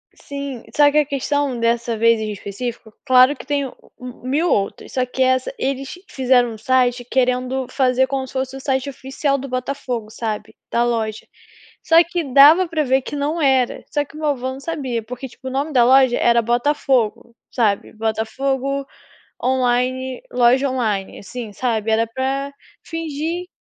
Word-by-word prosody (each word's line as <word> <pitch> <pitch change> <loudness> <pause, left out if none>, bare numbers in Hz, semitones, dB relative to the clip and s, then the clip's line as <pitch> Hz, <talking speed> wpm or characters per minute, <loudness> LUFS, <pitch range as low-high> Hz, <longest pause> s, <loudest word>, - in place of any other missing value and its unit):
sim. 280 -4 -7
Só 290 -1 +6
que 300 - +1
a 300 - +2
questão 280 -2 -1
dessa 230 0 0
vez 230 0 +4
em 215 -1 -3
específico, 220 +3 -6
claro 260 +1 +6
que - - -11
tem 285 0 0
o 260 - -8 0.2
o 250 0 -10
1000 310 +6 +1
outras, 200 0 -1
só 255 -1 +1
que 255 +1 -5
essa 260 - +1
eles 275 -6 -3 0.2
fizeram 250 -2 +3
um 220 - -8
site 245 +1 +1
querendo 255 +1 0
fazer 260 -1 +2
como 265 -1 -2
se - - -14
fosse 260 0 -3
o - - -6
site 265 0 -1
oficial 275 +1 -2
do 275 +1 -6
Botafogo, 255 -3 -4
sabe, 220 -1 -5 0.2
da 235 - +2
loja. 225 -2 -2 0.6
Só 325 - +2
que 340 0 -3
dava 310 +7 +8
para 315 -2 0
ver 265 0 +2
que - - -6
não 295 +4 -1
era, 265 -4 +2
só 290 - +2
que 295 - -17
o - - -8
meu 305 -1 0
avô 260 -2 -2
não 265 - -9
sabia, 270 -7 -3
porque 250 +4 -7
tipo 260 +2 -11
o - - -7
nome 280 +4 -2
da 240 -2 +5
loja 260 -1 +5
era 235 0 +4
Botafogo, 240 -1 0 0.2
sabe, 210 -4 0
Botafogo 265 +5 -2 0.6
online, 255 0 0
loja 250 +3 +3
online, 215 -7 -2
assim, 230 +2 -7
sabe, 225 -2 -1
era 225 +1 +2
pra 270 +4 -2 0.3
fingir. 330 +2 -4
260 Hz, 175 wpm, -20 LUFS, 240-275 Hz, 0.6 s, dava